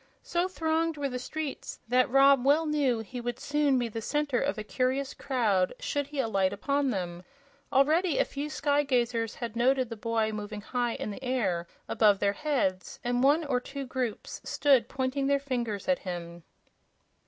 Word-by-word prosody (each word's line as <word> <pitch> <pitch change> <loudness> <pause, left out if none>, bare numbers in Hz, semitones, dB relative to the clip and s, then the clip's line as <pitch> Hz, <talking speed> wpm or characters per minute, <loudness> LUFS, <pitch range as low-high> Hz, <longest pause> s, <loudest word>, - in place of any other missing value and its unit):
So 350 +1 0
thronged 325 -2 0
were 285 -1 -1
the 250 -1 -4
streets 300 +2 -5
that 250 +2 +3
Rob 275 0 +6
well 295 +4 +4
knew 280 -7 +1
he 245 +3 -7
would 240 0 -3
soon 290 -2 +2
be 240 -1 0
the 225 0 -5
center 290 0 0
of 275 -3 -1
a 215 - -4
curious 260 +4 -1
crowd 220 -9 +1
should 290 - -2
he 290 -1 -6
alight 195 -6 +1
upon 280 +7 0
them. 180 -5 -3 0.5
Already 305 +4 +3
a - - +3
few 285 +2 -5
sky 290 -1 +1
gazers 240 -5 0
had 235 -2 -5
noted 255 +1 +2
the 230 - -5
boy 225 0 0
moving 210 0 -5
high 240 +2 -1
in 210 - -4
the 260 - -9
air, 195 -10 0 0.2
above 210 -3 +4
their 200 0 +1
heads, 230 -11 -1
and 245 0 0
one 290 +5 +4
or 260 -3 +1
two 275 +2 -6
groups 250 -4 -4
stood 275 -4 +3
pointing 270 +1 -1
their 280 0 +3
fingers 240 -7 -3
at 275 -1 +2
him. 175 -2 -6
255 Hz, 180 wpm, -29 LUFS, 225-280 Hz, 0.5 s, Rob